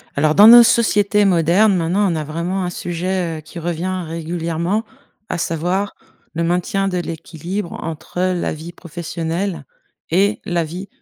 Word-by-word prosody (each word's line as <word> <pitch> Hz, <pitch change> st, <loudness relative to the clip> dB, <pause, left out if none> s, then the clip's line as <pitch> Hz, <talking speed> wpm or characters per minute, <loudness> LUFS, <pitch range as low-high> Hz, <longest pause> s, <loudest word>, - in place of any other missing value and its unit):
Alors, 150 Hz, +2 st, +2 dB
dans 210 Hz, +2 st, +9 dB
nos 240 Hz, +1 st, +11 dB
sociétés 210 Hz, -3 st, +3 dB
modernes, 185 Hz, +3 st, +4 dB
maintenant, 180 Hz, +3 st, +1 dB
on -, -, -1 dB
a 155 Hz, -, -2 dB
vraiment 170 Hz, +5 st, -3 dB
un 180 Hz, -, -2 dB
sujet, 175 Hz, -1 st, -3 dB
heu, -, -, -11 dB
qui 155 Hz, +3 st, -13 dB
revient 175 Hz, +2 st, -3 dB
régulièrement, 170 Hz, +4 st, -2 dB, 0.4 s
à -, -, -3 dB
savoir 175 Hz, +5 st, -1 dB, 0.4 s
le 170 Hz, -, 0 dB
maintien 180 Hz, +3 st, 0 dB
de 180 Hz, -2 st, -1 dB
l'équilibre 170 Hz, +3 st, -5 dB
entre 165 Hz, +2 st, -6 dB
la 185 Hz, -1 st, 0 dB
vie 160 Hz, +3 st, -9 dB
professionnelle 170 Hz, +2 st, -4 dB, 0.5 s
et 200 Hz, +5 st, +2 dB
la 175 Hz, -2 st, 0 dB
vie 175 Hz, +5 st, -7 dB
175 Hz, 155 wpm, -19 LUFS, 165-195 Hz, 0.5 s, nos